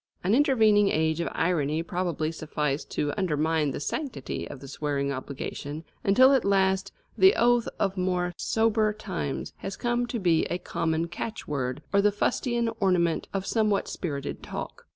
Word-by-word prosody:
An 190 +4 +2
intervening 220 -7 +4
age 160 +1 +1
of 170 - -1
irony 160 -2 0
probably 170 -3 -2
sufficed 150 -3 -3
to 145 -1 -1
undermine 160 -3 +1
the 135 - -4
sanctity 245 - -4
of 135 - -8
the 135 - -10
swearing 140 0 -2
obligation, 140 +3 -5 0.2
until 255 +7 +6
at 265 - +3
last 190 -1 +2 0.2
the 380 +2 +6
oath 240 0 +3
of 195 -1 0
more 180 -1 0
sober 220 0 +1
times 190 -9 -4
has 195 - -6
come 240 0 0
to 240 - -3
be 175 -6 +2
a 175 - -2
common 165 -2 -1
catchword, 150 - -4
or 200 - +5
the 210 +1 +4
fustian 235 +3 0
ornament 180 -5 +2
of 195 -1 -2
somewhat 215 -2 +1
spirited 140 -6 -4
talk. - - -7
180 Hz, 155 wpm, -27 LUFS, 155-215 Hz, 0.2 s, until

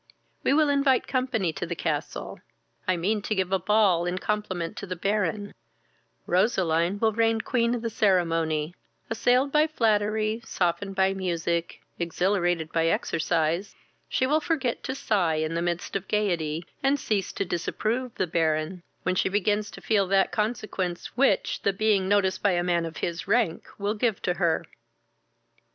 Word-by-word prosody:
We - - +2
will 300 +1 +4
invite 275 -2 +3
company 245 - 0
to 175 - -4
the 170 - -3
castle; 155 -2 -3 0.5
I 185 -1 +2
mean 205 +5 0
to 215 - -2
give 190 -1 -1
a 190 - +2
ball 190 -3 +3
in 180 +1 -1
compliment 185 -5 -2
to 200 - -6
the 185 - -3
Baron: 205 +2 -1 0.7
Roseline 180 -2 +2
will 220 +1 +2
reign 225 0 +2
queen 235 0 +1
of 240 - -5
the 230 - -2
ceremony; 165 -6 +1 0.4
assailed 250 +4 +2
by 300 +2 +4
flattery, 215 -4 +1
softened 195 0 -1
by 190 0 +3
music, 170 -3 -2 0.2
exhilirated 175 -1 0
by 165 0 +2
exercise, 165 +2 0 0.3
she 260 - +1
will 300 +4 +2
forget 285 -7 -1
to 260 - -3
sigh 190 -11 +1
in 155 +1 -1
the 170 - -1
midst 175 +1 -2
of 195 -1 -2
gaiety, 170 -6 0 0.2
and 275 +1 +2
cease 205 -6 -1
to 200 - -2
disapprove 220 +8 -2
the - - 0
Baron, 160 +1 0 0.2
when 185 - +1
she 185 - +1
begins 205 +1 0
to - - -11
feel 200 -3 +2
that 195 0 +3
consequence 210 -5 -2
which 270 +3 +2
the 200 - +1
being 200 -2 +2
noticed 190 -2 +2
by 200 -2 +3
a 175 0 +1
man 170 -2 +1
of 165 - -9
his 170 +1 -3
rank 215 -5 +1
will 205 +1 -1
give 220 -2 0
to 180 - +1
her." 170 -2 0
195 Hz, 165 wpm, -26 LUFS, 170-220 Hz, 0.7 s, will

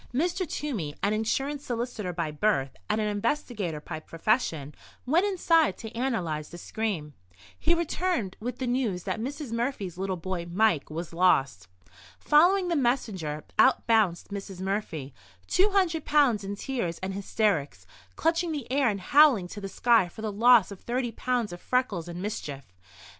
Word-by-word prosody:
Mr. 345 +4 0
Toomey, 210 - -3
an 205 +1 +2
insurance 270 +7 -1
solicitor 235 -6 -3
by 170 -3 -2
birth 150 -5 0
and 215 - +1
an 215 - 0
investigator 210 - -2
by 155 +1 -6
profession, 165 - -1 0.3
went 335 +10 +3
inside 335 -5 +3
to 225 0 -9
analyse 180 - -2
the 175 - -9
scream. 175 -6 -3 0.5
He 340 +2 +3
returned 335 - -1
with 245 +3 -4
the 260 - -3
news 240 -8 -1
that - - -3
Mrs. 275 +2 -5
Murphy's 230 -7 -3
little 190 -1 -2
boy, 175 0 -4
Mike, 180 -4 +2
was 165 +2 -6
lost. 135 - +2 0.5
Following 360 +5 +4
the 345 - 0
messenger, 210 - -1 0.2
out 260 - +5
bounced 215 -7 +2
Mrs. 195 -2 -7
Murphy—two 150 - -2
hundred 360 -6 +1
pounds 275 -9 +3
in 200 +1 -4
tears 200 -8 -3
and 190 0 -2
hysterics, 200 -6 -1 0.3
clutching 335 +1 +1
the 285 -6 -5
air 270 -2 +3
and 200 -2 -3
howling 275 -6 +5
to 205 - -8
the 195 - -5
sky 230 -3 +3
for 220 - -10
the 215 - -1
loss 230 0 +5
of 195 - -8
thirty 240 0 -2
pounds 240 -3 -1
of 175 - -9
freckles 215 -10 0
and 175 +1 -6
mischief. 145 -10 -5
215 Hz, 160 wpm, -27 LUFS, 175-265 Hz, 0.5 s, out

